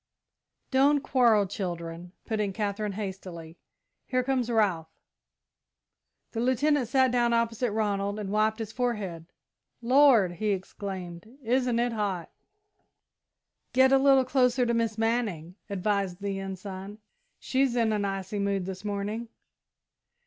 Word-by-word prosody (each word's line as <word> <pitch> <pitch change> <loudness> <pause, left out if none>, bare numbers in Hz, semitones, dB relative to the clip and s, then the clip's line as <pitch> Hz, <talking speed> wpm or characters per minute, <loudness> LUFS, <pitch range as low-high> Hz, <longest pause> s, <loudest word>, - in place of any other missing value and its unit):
"Don't 280 +2 +4
quarrel, 235 -7 +3
children," 175 -3 -5
put 220 -1 -2
in 205 -2 -1
Katherine, 205 0 -2
hastily. 185 -5 -7 0.5
"Here 255 -1 +1
comes 255 -2 0
Ralph." 200 -8 +1 1.4
The 225 - -4
Lieutenant 260 +2 +2
sat 260 0 +3
down 240 -1 +2
opposite 230 +1 +1
Ronald 205 -1 -1
and 205 -2 -4
wiped 215 +1 +2
his 220 -2 -5
forehead. 210 -10 -3 0.5
"Lord!" 245 -6 +5
he 205 +4 -1
exclaimed, 190 +2 -7
"isn't 245 0 +1
it 240 0 +1
hot!" 200 -6 -2 1.4
"Get 260 +1 +5
a 270 - +6
little 270 -1 +5
closer 250 -1 +2
to 235 - +1
Miss 230 -2 0
Manning," 220 -8 -1 0.2
advised 200 -2 -1
the 200 -1 -3
Ensign. 195 +1 -7 0.4
"She's 265 -2 0
in 230 -2 +2
an 210 -1 0
icy 195 +1 -3
mood 200 -2 0
this 190 +1 -6
morning." 210 +3 -3
215 Hz, 125 wpm, -28 LUFS, 195-245 Hz, 1.4 s, a